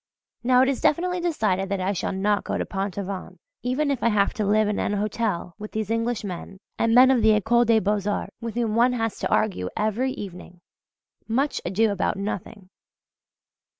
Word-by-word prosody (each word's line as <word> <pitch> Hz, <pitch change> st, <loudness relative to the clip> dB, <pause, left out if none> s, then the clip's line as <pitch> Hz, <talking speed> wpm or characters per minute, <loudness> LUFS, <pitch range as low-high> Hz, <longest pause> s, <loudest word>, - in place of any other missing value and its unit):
Now 250 Hz, +1 st, +5 dB
it -, -, +2 dB
is 275 Hz, -1 st, -1 dB
definitely 360 Hz, +3 st, +1 dB
decided 215 Hz, -, 0 dB
that 200 Hz, -1 st, -1 dB
I 190 Hz, +2 st, 0 dB
shall 185 Hz, -, -2 dB
not 200 Hz, +1 st, 0 dB
go -, -, -2 dB
to -, -, -2 dB
Pont 195 Hz, 0 st, -4 dB
Aven 195 Hz, -1 st, -5 dB, 0.2 s
if 275 Hz, +1 st, 0 dB
I 235 Hz, -, +3 dB
have 205 Hz, -2 st, +2 dB
to 215 Hz, -, -2 dB
live 215 Hz, +1 st, +3 dB
in 210 Hz, -, -1 dB
an -, -, 0 dB
hotel 205 Hz, -4 st, -2 dB
with 210 Hz, 0 st, -8 dB
these 220 Hz, -1 st, -2 dB
Englishmen 215 Hz, -5 st, -3 dB, 0.2 s
and 230 Hz, 0 st, +3 dB
men 255 Hz, +1 st, +8 dB
of 250 Hz, -3 st, +3 dB
the 220 Hz, 0 st, +5 dB
Ecole 235 Hz, +4 st, +3 dB
des 225 Hz, -1 st, +4 dB
Beaux 205 Hz, +1 st, 0 dB
Arts, 205 Hz, -, -3 dB
with 230 Hz, -1 st, -5 dB
whom 230 Hz, -3 st, 0 dB
one 245 Hz, +2 st, +4 dB
has 225 Hz, -3 st, -2 dB
to -, -, -2 dB
argue 190 Hz, -, 0 dB
every 230 Hz, +5 st, 0 dB
evening 180 Hz, -2 st, -9 dB, 0.7 s
much 265 Hz, +6 st, 0 dB
ado 210 Hz, +4 st, +2 dB
about 200 Hz, -1 st, -1 dB
nothing! 200 Hz, -1 st, -5 dB
215 Hz, 190 wpm, -24 LUFS, 200-240 Hz, 0.7 s, men